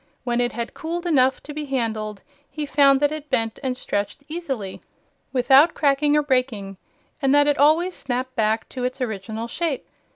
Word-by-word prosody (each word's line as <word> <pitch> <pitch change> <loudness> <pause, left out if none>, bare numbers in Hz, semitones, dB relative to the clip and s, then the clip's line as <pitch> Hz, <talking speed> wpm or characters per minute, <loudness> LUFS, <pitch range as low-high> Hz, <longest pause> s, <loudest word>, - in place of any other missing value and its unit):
When 240 -1 0
it 245 - 0
had 235 0 -4
cooled 340 +2 -4
enough 265 -6 +2
to 295 - -8
be 300 0 -4
handled, 220 -6 -3 0.3
he 305 -1 -4
found 275 -1 +4
that 290 0 +3
it 305 -1 -6
bent 225 -1 0
and 260 -2 -2
stretched 205 +2 -3
easily, 270 - -5 0.5
without 270 +5 +5
cracking 290 +1 +3
or 300 - +2
breaking, 250 -8 -1 0.4
and 275 0 +3
that 290 0 +5
it 290 -1 +1
always 320 +6 +4
snapped 255 -2 -4
back 220 0 +1
to 255 - -5
its 255 +2 -2
original 220 -1 -4
shape. 310 +1 -2
265 Hz, 175 wpm, -23 LUFS, 230-295 Hz, 0.5 s, without